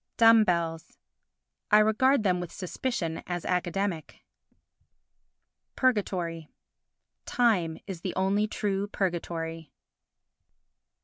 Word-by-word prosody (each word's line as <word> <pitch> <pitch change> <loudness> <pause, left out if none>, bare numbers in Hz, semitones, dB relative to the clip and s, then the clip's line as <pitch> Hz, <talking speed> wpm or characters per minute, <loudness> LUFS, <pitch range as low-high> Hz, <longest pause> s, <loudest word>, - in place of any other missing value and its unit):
Dumb 225 -1 +7
Bells 165 -3 -2 0.7
I 210 - +6
regard 220 +4 +3
them 180 -3 +2
with 175 -1 -6
suspicion 185 -3 -3
as 175 -1 -4
academic. 180 -1 -2 1.5
Purgatory 180 - -1 0.8
Time 185 -10 +1
is 185 -4 -7
the 185 - -4
only 195 +3 +1
true 200 -1 -2
purgatory. 165 -5 -3
185 Hz, 85 wpm, -28 LUFS, 170-210 Hz, 1.5 s, Dumb